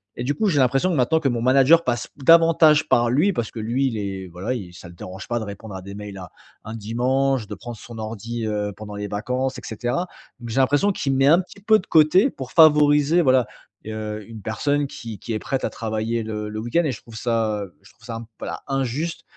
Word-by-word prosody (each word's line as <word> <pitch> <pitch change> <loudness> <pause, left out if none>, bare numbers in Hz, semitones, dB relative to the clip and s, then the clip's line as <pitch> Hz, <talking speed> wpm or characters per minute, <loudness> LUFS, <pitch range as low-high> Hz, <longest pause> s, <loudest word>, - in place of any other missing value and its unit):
et 120 - -4
du 145 +3 -1
coup, 220 - 0
j'ai 150 -7 +2
l'impression 135 +7 +2
que - - 0
maintenant 150 +4 +2
que 150 - 0
mon 120 -2 -2
manager 135 +6 +5
passe 120 - -1
davantage 160 +1 +5
par 120 0 +3
lui, 155 +11 +2
parce 120 -8 -3
que 115 - -7
lui, 120 +5 0
il 115 -4 -3
est 95 -2 -4
voilà, 90 +7 -4
il 95 -8 -6
ça 90 - -11
le 85 - -13
dérange 95 +3 -9
pas 120 0 -1
de - - -4
répondre 100 0 -8
à 95 - -6
des 100 +2 -9
mails 105 -1 -8
à 90 -2 -9 0.3
un 110 - -7
dimanche, 125 +3 0
de 105 - -6
prendre 120 +2 -8
son 115 +2 -11
ordi, 115 +1 -5
heu, 105 -1 -2
pendant 105 -1 -8
les 105 0 -4
vacances, 125 +6 -2
et - - -8
cetera. 120 - -2 0.3
Donc, 120 - -8
j'ai 120 +4 0
l'impression 145 +10 +3
qu'il 140 - -2
me - - 0
met 135 +1 +4
un 165 +5 +6
petit 190 +2 -15
peu 215 +2 +5
de - - -12
côté 165 - +5
pour 130 - -8
favoriser 150 0 +5
voilà, 130 -6 +3 0.4
heu, 110 -1 -5
une 115 -2 -10
personne 145 +6 0
qui 115 -5 -8
qui 115 - -5
est 110 - -1
prête 135 +3 -2
à - - -1
travailler, 110 +1 -2
le 105 -1 -4
le 105 0 -5
week-end, 120 +10 0
et 145 - 0
je 120 - -8
trouve 115 - -14
ça, 110 -2 -1
heu, 95 -3 -12
je 95 - -19
trouve 110 - -20
ça 115 -2 -5
un - - -7
p - - -16
voilà, - - -5
injuste, 135 +5 -2
120 Hz, 250 wpm, -22 LUFS, 110-145 Hz, 0.4 s, un